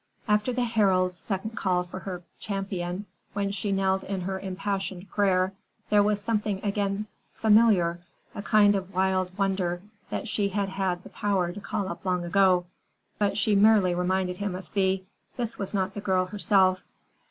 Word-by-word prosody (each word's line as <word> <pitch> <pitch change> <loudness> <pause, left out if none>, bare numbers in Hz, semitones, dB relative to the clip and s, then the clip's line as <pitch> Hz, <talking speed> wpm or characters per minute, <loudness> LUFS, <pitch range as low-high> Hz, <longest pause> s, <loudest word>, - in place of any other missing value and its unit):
After 210 +3 +2
the 250 0 0
Herald's 190 -6 +2
second 195 +4 -4
call 185 -5 0
for 180 +1 -8
her 180 -2 -6 0.2
champion, 195 -2 -3 0.3
when 200 -1 -1
she 200 +1 -2
knelt 190 0 +1
in 195 -1 -3
her 190 +1 -3
impassioned 195 0 -3
prayer, 190 -2 +2 0.4
there 210 -1 +6
was 205 0 +1
again 210 -3 0
something 200 0 -1 0.3
familiar, 210 -6 +4 0.3
a - - -5
kind 205 0 +5
of 195 -1 -4
wild 185 0 +1
wonder 190 -3 0 0.3
that - - -3
she 205 -2 0
had 200 0 -1
had 190 -2 -2
the - - -11
power 195 -4 0
to 205 +3 -8
call 200 -1 -2
up 170 -2 -6
long 180 -2 0
ago. 185 0 +4 0.5
But 200 -1 +1
she 215 0 +2
merely 200 -3 +5
reminded 180 +1 0
him 200 -2 -2
of 185 - -8
Thea; 190 -2 +1 0.4
this 235 -2 -3
was 195 - -3
not 195 -1 -1
the 205 - -5
girl 185 -2 +2
herself. 190 -1 +2
195 Hz, 170 wpm, -27 LUFS, 185-205 Hz, 0.5 s, there